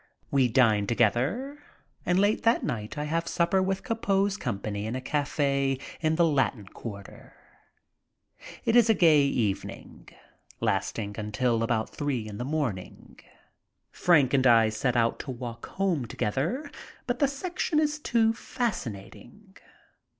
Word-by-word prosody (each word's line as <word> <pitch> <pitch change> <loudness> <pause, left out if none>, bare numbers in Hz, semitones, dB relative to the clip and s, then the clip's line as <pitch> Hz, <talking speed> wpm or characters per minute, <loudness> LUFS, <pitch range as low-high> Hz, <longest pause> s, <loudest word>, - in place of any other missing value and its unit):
We 135 -3 +4
dine 110 -4 +3
together, 135 - 0 0.5
and 180 - +3
late 205 +2 +2
that 230 +1 +2
night 110 -5 -4
I 150 - -2
have 165 +3 -1
sup 170 0 0
per 190 - +4
with 190 0 -1
Copeau's 200 -4 0
company 105 - -4
in 115 - -3
a - - -2
cafe 140 -1 0 0.2
in 155 -1 +1
the 170 +1 +4
Latin 135 -8 0
Quarter. 100 0 -10 1.3
It 230 - +2
is 235 -2 +6
a 220 - +5
gay 160 -5 +5
evening, 115 -8 -3 0.5
lasting 105 -2 -2
until 115 +2 0
about 115 -1 -1
three 135 -7 -2
in 105 -1 -8
the - - -2
morning. 130 -10 -4 0.7
Frank 145 -7 +3
and 130 -1 +4
I 115 -2 +6
set 120 +3 -1
out 115 0 +1
to - - -7
walk 120 -2 -6
home 180 -10 -1
together, 165 - -2 0.3
but 245 0 -2
the 280 - +4
section 310 +2 -1
is 300 0 0
too 225 -5 +2
fascinating. 200 - -6
140 Hz, 145 wpm, -27 LUFS, -, 1.3 s, is